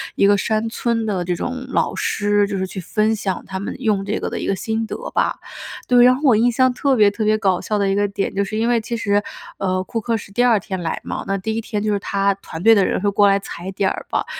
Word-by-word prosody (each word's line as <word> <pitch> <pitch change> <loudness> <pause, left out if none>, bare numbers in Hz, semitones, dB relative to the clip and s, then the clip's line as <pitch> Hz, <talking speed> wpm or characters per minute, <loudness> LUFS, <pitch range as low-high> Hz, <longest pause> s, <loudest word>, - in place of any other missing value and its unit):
一 - - +3
个 205 0 +4
山 220 +2 0
村 230 -1 -1
的 190 -4 -1
这 180 0 -1
种 255 +7 -4
老 - - 0
师， 205 -1 +1
就 200 -1 -3
是 190 - -1
去 190 - -7
分 215 +5 0
享 195 -3 -3
他 190 -1 -5
们 200 - -5
用 210 -5 +1
这 210 - -1
个 - - -3
的 - - -4
一 - - -4
个 195 - +1
心 220 +3 -2
得 - - -5 0.2
吧。 - - 0 0.5
对， 245 -1 +6
然 250 0 +6
后 275 - -7
我 255 -6 +5
印 235 +3 +3
象 255 +1 +3
特 275 +1 +1
别 210 -3 +5
特 215 +1 -3
别 215 0 +3
搞 190 -4 +1
笑 210 - -1
的 200 -1 +1
一 - - +1
个 205 0 +2
点， 200 0 -3
就 200 +1 0
是 215 +2 -4
因 230 +2 +1
为 240 -1 +3
其 235 +2 -4
实， 205 -2 +1 0.4
呃， 185 -1 -1
库 225 +4 -4
克 230 +1 -1
是 200 - -11
第 245 +4 +1
二 240 -3 +5
天 190 -2 -5
来 160 - -2
嘛， - - -4
那 195 0 0
第 220 +3 -3
一 225 - -1
天 210 -1 -3
就 215 - 0
是 205 - 0
他 200 0 0
团 170 -4 -9
队 225 +1 +7
的 200 -3 +3
人 - - 0
会 205 - +2
过 205 +1 +4
来 195 0 +4
踩 185 -1 -8
点 195 0 0
儿 - - -5
吧， - - -1
205 Hz, 310 characters per minute, -20 LUFS, 195-225 Hz, 0.5 s, 队